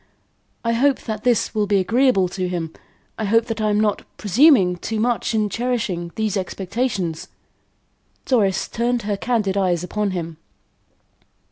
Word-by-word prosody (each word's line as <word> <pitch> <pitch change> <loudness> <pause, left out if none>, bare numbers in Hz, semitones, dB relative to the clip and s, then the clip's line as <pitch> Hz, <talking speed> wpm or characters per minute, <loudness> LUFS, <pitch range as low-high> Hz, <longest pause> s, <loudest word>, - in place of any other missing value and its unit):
I 230 - +2
hope 265 +3 +2
that 215 -2 -5
this 245 -2 +1
will 210 -2 0
be 200 0 +3
agreeable 215 0 +3
to 185 0 -3
him. 165 -3 -4 0.5
I 220 - -1
hope 225 +3 +3
that 225 -2 -4
I 215 - +1
am 210 0 +2
not 210 -2 +1 0.2
presuming 210 - +4
too 220 +5 -3
much 235 0 0
in 215 -1 +2
cherishing 210 -7 -2
these 215 -2 -1
expectations." 190 -2 -2 1.0
Doris 205 -8 +1
turned 240 0 -1
her 205 0 -1
candid 205 -2 -1
eyes 180 -3 +1
upon 210 +3 -1
him. 165 -3 -5
210 Hz, 150 wpm, -21 LUFS, 185-235 Hz, 1.0 s, presuming